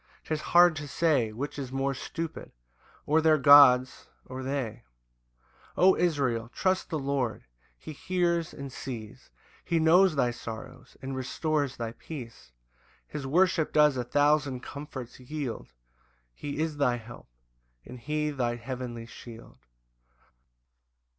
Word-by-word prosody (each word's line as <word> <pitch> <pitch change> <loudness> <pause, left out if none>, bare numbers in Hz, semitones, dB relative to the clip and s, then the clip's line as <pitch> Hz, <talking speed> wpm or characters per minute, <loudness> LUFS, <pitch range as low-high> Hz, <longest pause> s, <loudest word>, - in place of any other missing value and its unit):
'Tis 155 -1 -3
hard 175 0 +5
to 145 -1 -6
say 140 -6 +1
Which 140 +6 -5
is 130 -2 -5
more 135 +1 -1
stupid, 165 +5 -6 0.5
or 155 +2 +3
their 155 -1 +4
gods 130 -2 +6 0.2
or 130 +1 -7
they: 130 -4 -3 1.0
O 190 +1 +6
Israel, 130 -9 0
trust 185 +7 -1
the 160 - -2
Lord, 135 -5 -2 0.3
he 155 - -9
hears 170 0 -1
and 140 -2 -8
sees, 120 -1 -8 0.3
He 170 - 0
knows 165 +2 +5
thy 125 -4 +2
sorrows, 120 +2 -9
and 135 0 -4
restores 140 +2 -2
thy 115 -1 -4
peace: 115 - -10 0.6
His 145 -3 -6
worship 165 +1 +2
does 150 -2 +4
a 125 - -2
thousand 145 0 +1
comforts 135 -4 -8
yield, 130 -1 -5 0.7
He 145 - -6
is 155 -1 -2
thy 130 -4 +2
help, 120 0 -11 0.6
and 125 - -10
he 150 +4 -2
thy 120 -4 -1
heavenly 120 -1 -6
shield. 115 0 -12
140 Hz, 130 wpm, -28 LUFS, 125-155 Hz, 1.0 s, gods